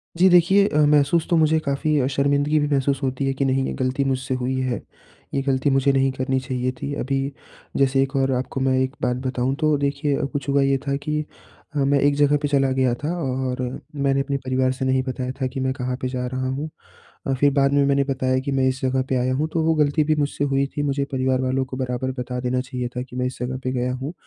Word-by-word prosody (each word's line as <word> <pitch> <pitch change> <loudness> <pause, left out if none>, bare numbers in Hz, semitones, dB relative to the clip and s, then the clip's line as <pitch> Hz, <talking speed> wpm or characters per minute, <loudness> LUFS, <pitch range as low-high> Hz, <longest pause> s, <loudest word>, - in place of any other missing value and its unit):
जी 180 +3 +5
देखिए 190 +3 +5
अ, 150 0 +3
महसूस 150 +2 +3
तो 170 - +3
मुझे 160 0 +3
काफ़ी 150 +1 0
अ, 130 - +1
शर्मिंदगी 140 +2 +2
भी 145 - +1
महसूस 140 -1 +1
होती 130 +1 -1
है 135 - +1
कि 135 +1 -1
नहीं 135 0 +1
ये - - -3
गलती 130 +2 0
मुझसे 130 0 -1
हुई 130 +1 -1
है, 125 -2 -2 0.5
ये 135 - +1
गलती 135 +1 +2
मुझे 135 0 +3
नहीं 135 0 +2
करनी 130 0 -1
चाहिए 130 -1 -2
थी। 145 - -3
अभी 135 +2 -1 0.6
जैसे 135 0 +3
एक 135 +1 -5
और 135 0 +2
आपको 130 +1 -4
मैं 130 0 +2
एक 130 +1 -1
बात 125 0 0
बताऊँ, 130 +1 -1
तो 155 -1 +2
देखिए, 140 +1 0
कुछ 140 0 -4
हुआ 140 0 +3
ये 135 0 +3
था 140 - +1
कि 150 +2 -2 0.5
अ, - - -1
मैं 140 0 +3
एक 145 +1 +3
जगह 145 0 +3
पे 145 - 0
चला 135 -2 +2
गया 130 -2 +2
था 150 - -1
और 130 -2 -2 0.3
मैंने 140 -1 +1
अपने 140 0 -2
परिवार 130 0 +1
से 130 0 -3
नहीं 130 0 +2
बताया 130 -1 -3
था 130 - +1
कि 135 - -3
मैं 130 0 0
कहाँ 125 -1 -3
पे 130 - -1
जा 125 -1 -3
रहा 130 0 -1
हूँ 140 +4 -3 0.6
अ, 135 - 0
फिर 145 +2 +3
बाद 140 0 +3
में 140 0 +4
मैंने 140 0 +2
बताया 130 -1 0
कि 140 - -1
मैं 135 -1 +2
इस 130 0 -2
जगह 130 0 +1
पे - - 0
आया 125 +1 +1
हूँ, 150 +4 0
तो 165 - +1
वो 160 0 +3
गलती 150 0 +2
भी 155 - +2
मुझसे 145 -1 -1
हुई 140 0 +1
थी 145 - 0
मुझे 140 -1 0
परिवार 130 0 +1
वालों 130 +1 0
को 130 0 -8
बराबर 130 0 -2
बता 125 0 -3
देना 125 0 0
चाहिए 125 -1 -4
था 125 - -1
कि 125 -1 -11
मैं 125 - 0
इस 130 - -5
जगह 130 +1 -3
पे 130 - -1
गया 125 0 -1
हूँ। 135 +5 -5
135 Hz, 250 wpm, -22 LUFS, 130-140 Hz, 0.6 s, जी